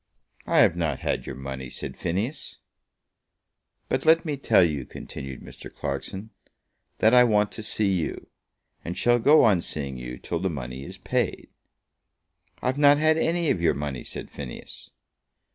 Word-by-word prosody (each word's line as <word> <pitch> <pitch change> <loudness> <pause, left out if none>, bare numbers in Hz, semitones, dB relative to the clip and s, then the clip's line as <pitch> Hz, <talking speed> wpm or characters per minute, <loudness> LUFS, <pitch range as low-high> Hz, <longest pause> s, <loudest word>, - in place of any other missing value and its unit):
"I - - +2
have 85 - +6
not 80 -6 -1
had - - -2
your 65 - -5
money," 65 -1 -6
said - - -6
Phineas. 105 - -3 1.3
"But 130 - -1
let 165 +1 +5
me 150 -2 -1
tell 135 -8 +4
you," 75 -5 0
continued 65 +1 -8
Mr. - - -11
Clarkson, 100 +3 -5 0.7
"that 110 +2 +4
I 125 0 +8
want 105 -3 +2
to - - -8
see 105 -2 0
you; 90 -4 -3 0.5
and 85 - -5
shall 120 0 +3
go 145 +7 +6
on 100 -6 +4
seeing 70 -5 -5
you 60 0 -7
till 85 - -4
the 95 +2 -1
money 65 -4 -6
is - - -9
paid." - - -2 1.1
"I've 130 +3 0
not 145 0 +7
had 155 +1 +4
any 170 -1 +1
of 85 - -1
your 85 - +3
money," 70 -3 -4
said - - -7
Phineas. 65 -4 -9
95 Hz, 160 wpm, -25 LUFS, -, 1.3 s, I